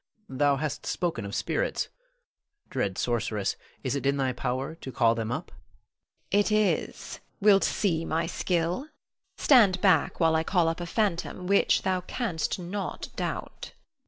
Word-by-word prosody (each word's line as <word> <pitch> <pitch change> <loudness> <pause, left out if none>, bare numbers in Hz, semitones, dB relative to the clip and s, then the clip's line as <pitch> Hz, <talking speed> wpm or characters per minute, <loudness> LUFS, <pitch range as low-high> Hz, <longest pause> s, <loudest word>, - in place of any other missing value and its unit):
thou 140 +1 +2
hast 145 +1 -4
spoken 165 - -1
of 100 - -5
spirits. - - -1 0.8
Dread 100 -8 -1
sorceress, 115 -4 -1 0.3
is - - -1
it 140 0 -1
in 140 0 +2
thy 130 -2 0
power 130 +5 -2
to 150 -5 -9
call 115 -3 +3
them 115 0 -3
up? - - -4
Norna. - - -19 0.8
It 205 - -1
is. 215 -1 0 0.2
Wilt 200 -1 +5
see 170 -6 +1
my 165 0 0
skill. 175 - -1 0.5
Stand 210 -10 +5
back 180 -6 +3
while 165 -2 +4
I 160 - +2
call 175 -1 +2
up 165 +2 -3
a 175 - -4
phantom 185 -2 -1
which 200 +2 +3
thou 185 -1 0
canst 185 - -2
not 190 +3 -5
doubt. - - -5
165 Hz, 155 wpm, -27 LUFS, 135-190 Hz, 0.8 s, Wilt